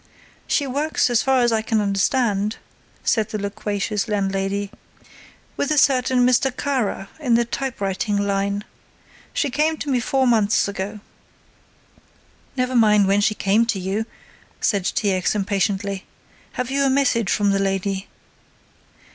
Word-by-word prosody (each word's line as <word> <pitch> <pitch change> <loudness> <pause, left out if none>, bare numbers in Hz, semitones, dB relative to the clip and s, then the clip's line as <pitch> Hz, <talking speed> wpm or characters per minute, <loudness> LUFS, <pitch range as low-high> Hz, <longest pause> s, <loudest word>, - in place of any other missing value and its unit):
"She 285 - +1
works 280 0 0
as 240 -1 +3
far 265 -1 +2
as 240 -1 +3
I 220 -1 +1
can 220 0 0
understand," 205 +1 +1 0.5
said 220 -3 +1
the 215 - -3
loquacious 205 +1 -2
landlady, 195 -1 -1 0.8
"with 285 - -1
a 305 - +1
certain 255 -2 +3
Mr. 255 +2 +3
Kara 245 -7 -2
in 250 -6 +2
the 235 0 +3
typewriting 205 -5 -2
line. 200 0 -1 0.7
She 285 - -1
came 310 +4 +1
to 285 - -3
me 255 - +2
four 265 +3 +1
months 220 -5 +3
ago." 200 +1 -5 1.6
"Never 255 0 0
mind 210 -4 +5
when 200 +1 +3
she 215 +1 +2
came 205 +4 +2
to 215 -4 -1
you," 195 +4 -2 0.5
said 200 -4 0
T. 205 0 0
X. 185 +2 0
impatiently. 200 -1 -1 0.5
"Have 250 +1 -3
you 275 +1 +1
a 275 - +3
message 260 -6 +2
from 205 -1 +2
the 195 - +1
lady?" 195 0 -1
215 Hz, 145 wpm, -22 LUFS, 200-250 Hz, 1.6 s, mind